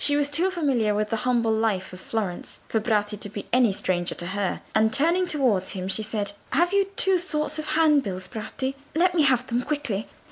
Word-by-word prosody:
She 290 Hz, 0 st, +4 dB
was 290 Hz, -1 st, +1 dB
too 335 Hz, +6 st, +2 dB
familiar 265 Hz, -, +1 dB
with 210 Hz, 0 st, -1 dB
the 225 Hz, -, +1 dB
humble 235 Hz, -2 st, +2 dB
life 220 Hz, -4 st, 0 dB
of 185 Hz, -, -10 dB
Florence 205 Hz, -6 st, -4 dB
for 220 Hz, -, 0 dB
Bratti 210 Hz, -2 st, 0 dB
to 205 Hz, -, -6 dB
be 205 Hz, 0 st, -7 dB
any 245 Hz, -4 st, +5 dB
stranger 180 Hz, -2 st, -1 dB
to 175 Hz, -, -4 dB
her, 195 Hz, +1 st, -2 dB
and 220 Hz, 0 st, +3 dB
turning 335 Hz, +8 st, +2 dB
towards 245 Hz, -, +1 dB
him 185 Hz, -1 st, -4 dB
she 195 Hz, +3 st, 0 dB
said, 210 Hz, -2 st, -2 dB, 0.2 s
"Have 350 Hz, +3 st, +2 dB
you 400 Hz, 0 st, +4 dB
two 385 Hz, -2 st, +3 dB
sorts 305 Hz, -4 st, 0 dB
of 310 Hz, -, -3 dB
handbills, 280 Hz, -, +2 dB
Bratti? 250 Hz, +5 st, -4 dB, 0.2 s
Let 355 Hz, +2 st, +3 dB
me 340 Hz, -, +3 dB
have 255 Hz, -3 st, +3 dB
them 245 Hz, -1 st, -1 dB
quickly." 275 Hz, -8 st, -2 dB
235 Hz, 210 wpm, -25 LUFS, 205-300 Hz, 0.2 s, any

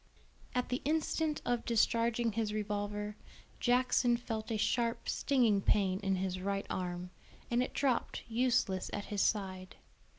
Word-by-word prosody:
At 250 Hz, -, 0 dB
the 250 Hz, -, -1 dB
instant 310 Hz, 0 st, 0 dB
of 245 Hz, -1 st, 0 dB
discharging 230 Hz, 0 st, +2 dB
his 215 Hz, -1 st, -1 dB
revolver, 210 Hz, 0 st, -2 dB, 0.4 s
Jackson 245 Hz, -1 st, +3 dB
felt 225 Hz, -2 st, -4 dB
a 220 Hz, -, 0 dB
sharp 230 Hz, +2 st, 0 dB
stinging 235 Hz, -8 st, +2 dB
pain 190 Hz, -2 st, +2 dB
in 195 Hz, -2 st, 0 dB
his 185 Hz, 0 st, -2 dB
right 200 Hz, +1 st, -1 dB
arm, 180 Hz, -1 st, -3 dB, 0.4 s
and 240 Hz, +1 st, +3 dB
it 255 Hz, -, -3 dB
dropped 265 Hz, -4 st, 0 dB
useless 230 Hz, -5 st, +1 dB
at 205 Hz, -, -3 dB
his 200 Hz, -, +1 dB
side. 185 Hz, -3 st, -1 dB
220 Hz, 140 wpm, -33 LUFS, 200-245 Hz, 0.4 s, Jackson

